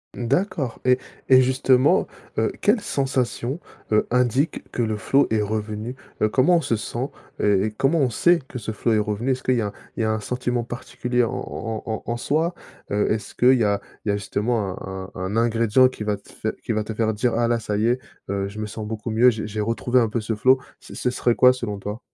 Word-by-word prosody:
D'accord. 140 - -1
Et 125 0 +4 0.3
et 130 -1 +8
justement, 130 +1 +3 0.3
heu, 110 - +2
quelles 210 +2 +3
sensations, 130 -2 -1 0.3
heu, 110 - +4
indiquent 125 +4 +1
que 120 - -1
le 110 -1 -1
flow 135 +7 +3
est 110 -1 +2
revenu? 110 +3 -3 0.3
Heu, 110 - +4
comment 140 +10 +4
on 165 - +1
se 115 - 0
sent? 120 +5 -3 0.3
Heu, 100 -2 +3
et 110 - -2
comment 135 +9 +1
on 135 -6 +2
sait 175 +9 +4
que 125 - -6
ce 110 0 -4
flow 110 +2 0
est 110 - +3
revenu? 105 +5 -1
Est-ce 130 0 -1
que, 130 - 0
qu'il 125 - +3
y 115 - +1
a 105 -1 -3 0.2
il - - -1
y - - +2
a 110 - +1
un 110 - 0
sentiment 125 +1 -2
particulier 125 +1 -2
en 115 - -1
en 110 -1 -4
en 110 -1 -3
en 120 - -2
soi? 160 +8 0 0.4
Heu, 105 0 +1
est-ce 110 0 -2
qu'il 130 +1 +5
y 115 - +2
a 100 -1 +1 0.2
il - - -1
y - - +4
a 100 - 0
justement 105 -1 -1
un 95 0 -6
un - - -7
un 95 +3 -3
ingrédient 115 +2 +4
qui 120 - -7
va 105 -1 0
te 100 - -19
fai - - -3
qui - - -1
va 110 0 0
te 110 - -5
faire 110 0 +1
dire 120 +3 +1
ah 115 +1 +2
là, 120 0 +1
ça 105 -2 -3
y 110 +3 +2
est, 125 +2 +2 0.3
heu, 100 0 -1
je 105 +2 -8
me 105 - -3
sens 105 +1 -6
beaucoup 110 +1 -4
mieux, 115 +3 +5
je, 110 -2 -4
j'ai 105 0 -3
retrouvé 120 +3 +1
un 115 - +2
peu 115 +1 -1
ce 110 +1 -2
flow, 130 +5 +4 0.2
ce - - -13
ce 125 - -1
serait 125 -1 +1
quoi 125 +2 +6
selon 115 -5 -4
toi? 105 +3 -5
115 Hz, 245 wpm, -23 LUFS, 105-125 Hz, 0.4 s, et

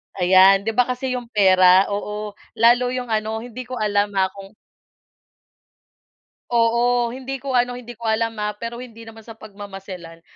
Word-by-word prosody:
Ayan, 190 +1 +5
di 225 - -1
ba 250 +2 +2
kasi 255 +1 -3
yung 250 -1 -4
pera, 190 -3 +4
oo, 210 +1 -4 0.2
lalo 240 +2 +4
yung 250 -1 -4
ano, 220 +1 -2
hindi 245 +1 -9
ko 255 - -6
alam 205 -2 0
ah, 190 -1 +1
kung 195 +1 -13 2.0
Oo, 235 +1 +2
hindi 265 +1 -6
ko 265 -2 -1
ano, 245 0 +1
hindi 240 -1 -10
ko 230 - -9
alam 225 0 -1
ha, 210 0 -2
pero 230 +3 -7
hindi 235 -2 -11
naman 225 -1 -13
sa 225 - -10
pagmamamaselan. 195 -5 -11
225 Hz, 160 wpm, -21 LUFS, 200-245 Hz, 2.0 s, Ayan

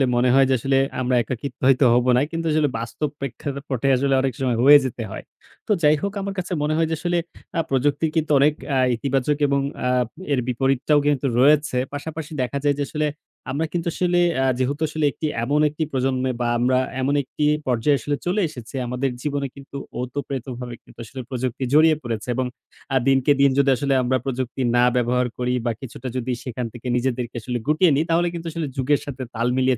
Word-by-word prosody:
মনে 125 +1 +3
হয় 135 0 +6
যে - - +4
আসলে 135 +2 +1 0.2
আমরা 125 0 +1
একাকিত্ব 130 +4 -6
হয়তো 135 0 +5
হব 125 +1 +3
না। 125 - +3
কিন্তু 165 0 -3
আসলে 150 -2 +2
বাস্তব 130 +6 -3
প্রেক্ষাপটে 140 -1 -4 0.3
অনেক 135 -2 0
সময় 125 -3 +1
হয়ে 145 +1 +10
যেতে 120 -2 -4
হয়। - - -7 0.4
তো - - -1
যাই 150 +1 +6
হোক, 200 0 -2
আমার 195 0 -3
কাছে 180 0 -3
মনে 155 +1 +1
হয় 165 -1 +2
যে - - +1
আসলে 175 0 0 0.4
আ - - +2
প্রযুক্তি 145 +4 +1
কিন্তু 155 -1 0
অনেক 145 +2 +4 0.2
আ - - +3 0.2
ইতিবাচক 135 +3 0
এবং 140 0 +1 0.7
এর 135 - +3
আ - - -9
বিপরীতটাও 135 +3 +2
কিন্তু 145 -2 +1
রয়েছে। 145 -1 +4 0.2
পাশাপাশি 155 +1 -6
দেখা 125 +3 -2
যায় 145 -1 +2
যে, 145 - +1
আসলে 155 -1 0 0.4
আমরা 150 +4 -1
কিন্তু 170 -1 -2
আসলে 175 -1 +1 0.4
যেহেতু 140 +4 -1
আসলে 155 -1 0 0.4
এমন 145 +5 +2
একটি 155 +2 -3
প্রজন্মে 130 0 0
বা 120 - +1
আমরা 130 +1 +3 0.2
এমন 140 +2 +1
একটি 150 +3 -3 0.2
পর্যায়ে 130 +4 +2
আসলে 145 - -2
চলে 185 +4 +1
এসেছি, 125 0 -10
আমাদের 125 +2 -1
জীবনে 140 -1 -2
কিন্তু 140 0 -9 0.2
ওতপ্রোতভাবে 125 -2 -5
কিন্তু - - -19
আসলে 130 +4 -7
প্রযুক্তি 130 0 -3
জড়িয়ে 155 +1 +6
পড়েছে। 115 -1 -4
এবং 130 - 0 0.5
আ 135 - +4
দিনকে 135 +1 +4
দিন 140 - +6
যদি 140 -1 +4
আসলে 140 -1 0
আমরা 130 +1 +2
প্রযুক্তি 130 0 -3
না 120 - +5
ব্যবহার 125 0 +1
করি 125 0 -1
বা 120 - +2
কিছুটা 130 0 -7
যদি 125 +1 -2
সেখান 125 -1 -4
থেকে 120 +1 -8
নিজেদেরকে 125 -1 -2
আসলে 125 +2 -3
গুটিয়ে 155 +2 +4
নিই, 150 - +2
তাহলে 170 +1 +3
কিন্তু 170 0 -6
আসলে 160 -2 -3
যুগের 140 +2 +2
সাথে 135 -2 -6
তাল 115 +2 0
মিলিয়ে 130 -2 +2
135 Hz, 195 wpm, -22 LUFS, 125-150 Hz, 0.7 s, হয়ে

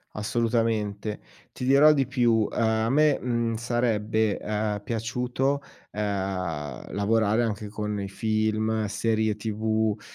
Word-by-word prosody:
Assolutamente. 110 -2 -1 0.3
Ti 125 - -5
dirò 140 +4 +7
di 140 -3 +2
più: 120 -4 +2
a 110 -1 +1
me, 150 0 +4
mhmm, 115 -2 -1
sarebbe, 110 -2 0
ehm, 105 -1 -2
piaciuto, 125 +5 -1 0.3
ehm, 95 -9 -3
lavorare 110 +2 +2
anche 105 -2 -3
con 105 0 -3
i 100 - -3
film, 110 +1 0
serie 110 +1 0
TV, 110 0 -1
110 Hz, 110 wpm, -26 LUFS, 105-115 Hz, 0.3 s, dirò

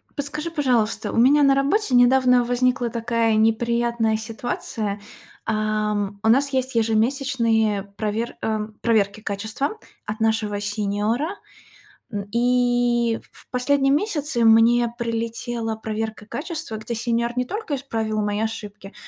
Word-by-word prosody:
Подскажи, 300 +3 -3
пожалуйста, 240 -9 0
у - - -4
меня 280 +5 +5
на 275 -1 +5
работе 280 +4 +1
недавно 250 0 +5
возникла 245 0 +1
такая 230 -1 0
неприятная 230 0 +1
ситуация. 220 -2 -4 0.5
Ам, 215 -2 -1
у 220 - +3
нас 275 +5 +4
есть 260 -2 -1
ежемесячные 225 -2 +1
провер 215 +2 -2
ам, 215 -1 -2
проверки 215 -2 +1
качества 220 - -3 0.3
от 215 +1 -5
нашего 220 -2 0
сеньора, 210 +6 -1 0.8
м. 200 -2 -4
И 245 -1 +2
в - - -11
в - - -53
последние 270 +2 +2
месяцы 300 - 0
мне 230 +1 +5
прилетела 230 0 -3
проверка 220 -1 -4
качества, 320 - -5
где 220 +2 -5
сеньор 235 +1 -1
не 250 - +1
только 415 - -4
исправил 225 -5 -2
мои 205 0 -1
ошибки, 210 -3 -5
230 Hz, 125 wpm, -23 LUFS, 220-250 Hz, 0.8 s, меня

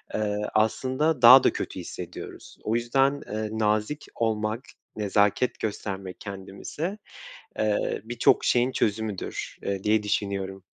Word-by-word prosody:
eee, 105 -1 0 0.2
aslında 130 +7 +1
daha 130 +3 +10
da - - +3
kötü - - -4
hissediyoruz. - - -9
O 110 - 0
yüzden, 135 +4 +2
eee, 110 0 -3
nazik 110 +6 0
olmak, 110 0 -1 0.4
nezaket 105 +3 +1
göstermek 95 -3 -4
kendimize, 100 - -5 0.6
eee, 105 -1 0
birçok 120 +1 +2
şeyin 125 +1 +3
çözümüdür, 105 -3 -2
eee, 100 -1 -2
diye 105 0 +2
düşünüyorum. 100 -2 -2
110 Hz, 115 wpm, -26 LUFS, 100-120 Hz, 0.6 s, daha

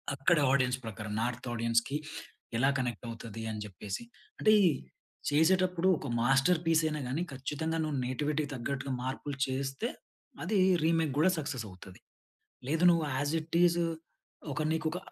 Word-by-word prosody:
అక్కడ 145 +6 +3
ఆడియన్స్ 130 -2 +2
ప్రకారం, 105 -1 -5
నార్త్ 125 +1 -2
ఆడియన్స్‌కి 115 +4 +1 0.6
ఎలా 135 +3 +4
కనెక్ట్ 120 -2 -3
అవుతది, 115 -1 -7
అని 105 - -4
చెప్పేసి. 100 - -6 0.4
అంటే 215 - +5 0.8
చేసేటప్పుడు 180 +4 +3
ఒక 140 - -6
మాస్టర్ 135 +7 +4
పీస్ 165 0 +4
అయినా 150 -1 -2
గాని, 145 +8 -1
ఖచ్చితంగా 150 +5 -2
నువ్వు 155 -2 -2
నేటివిటీకి 145 +3 -1
తగ్గట్టుగా 135 +2 -3
మార్పులు 135 +2 -4
చేస్తే, 135 - -2 0.5
అది 215 - 0 0.3
రీమేక్ 165 -3 +2
కూడా 185 +5 +5
సక్సెస్ 135 -6 -3
అవుతది. 90 0 -13 0.7
లేదు 160 +3 +1
నువ్వు 165 -2 +2
ఆస్ 145 +2 0
ఇట్ 160 +1 -2
ఈజ్ 175 0 +3 0.7
ఒక 150 - -2
నీకు 160 0 -1
ఒక 175 - -3
140 Hz, 145 wpm, -31 LUFS, 125-160 Hz, 0.8 s, అంటే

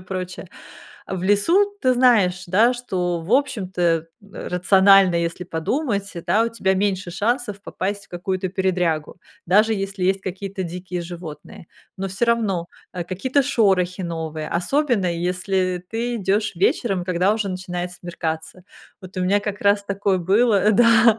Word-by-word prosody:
прочее. 185 0 -6 0.6
В 190 -2 -4
лесу 340 - +3
ты 255 -2 +4
знаешь, 210 -8 +3
да, 215 +7 +4
что, 180 -8 -2
в 165 +4 -9
общем-то, 220 -9 0
э, 165 -1 +2 0.4
рационально, 190 0 +5
если 170 +1 -2
подумать, 200 - -2 0.2
да, 210 +6 +3
у - - 0
тебя 215 -4 0
меньше 190 -2 -1
шансов 210 +2 -1
попасть 200 +1 -4
в - - -43
какую-то 185 +1 -3
передрягу. 180 -4 -1 0.3
Даже 215 +5 +4
если 195 -1 -4
есть 190 +1 +1
какие-то 190 +1 -5
дикие 180 +1 -5
животные. 170 -2 -9 0.3
Но 195 0 -2
всё 195 +5 0
равно, 210 -7 0 0.3
э, 175 -1 -3
какие-то 255 +11 0
шорохи 190 -8 +1
новые, 160 -2 -4
особенно 235 - +1
если 180 +1 -1
ты 235 +2 -2
идёшь 205 0 0
вечером, 190 +1 +1
когда 185 +3 +2
уже 215 -3 -2
начинает 180 -1 -4
смеркаться. 170 -1 -5 0.4
Вот 185 0 -11
у - - -1
меня 200 +3 +2
как 205 0 -5
раз 200 0 +3
такое 200 -1 0
было, 205 +3 +3
да. 230 0 +5
190 Hz, 145 wpm, -22 LUFS, 180-210 Hz, 0.6 s, рационально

